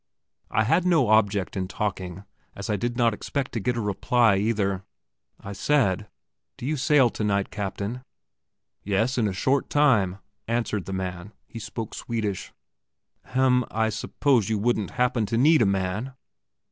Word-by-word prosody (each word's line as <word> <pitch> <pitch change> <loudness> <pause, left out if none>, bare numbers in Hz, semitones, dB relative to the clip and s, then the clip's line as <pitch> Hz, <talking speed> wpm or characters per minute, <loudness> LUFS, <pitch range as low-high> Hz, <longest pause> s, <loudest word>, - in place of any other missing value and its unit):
I 110 - +2
had 130 +11 +2
no 165 -10 +3
object 105 -3 +2
in 95 -1 -2
talking, 95 -2 -4 0.3
as 100 +2 -4
I - - +2
did 120 +4 -2
not 115 -3 +3
expect 135 +5 -3
to 115 - -2
get 120 +4 -1
a - - 0
reply, 110 +2 +2
either. 100 -2 0 0.6
I 100 - -7
said: 105 -5 +1 0.5
"Do - - -7
you 155 +3 0
sail 135 -3 +4
tonight, 100 -2 -1
Captain?" 105 +4 -4 0.8
"Yes; 110 +6 0
in 110 - +2
a - - -1
short 130 +9 0
time," 115 -11 +3 0.3
answered 115 -4 -1
the 95 - -6
man. 95 +1 -5
He 115 - -9
spoke 110 0 -6
Swedish. 110 -5 -3 0.7
"Hem, 130 -1 +2
I 110 0 0
suppose 115 +1 +1
you 110 - +1
wouldn't 110 -1 0
happen 125 -3 +1
to 115 - -1
need 155 +6 +5
a 110 - +4
man?" 100 +6 -1
110 Hz, 160 wpm, -25 LUFS, 100-125 Hz, 0.8 s, need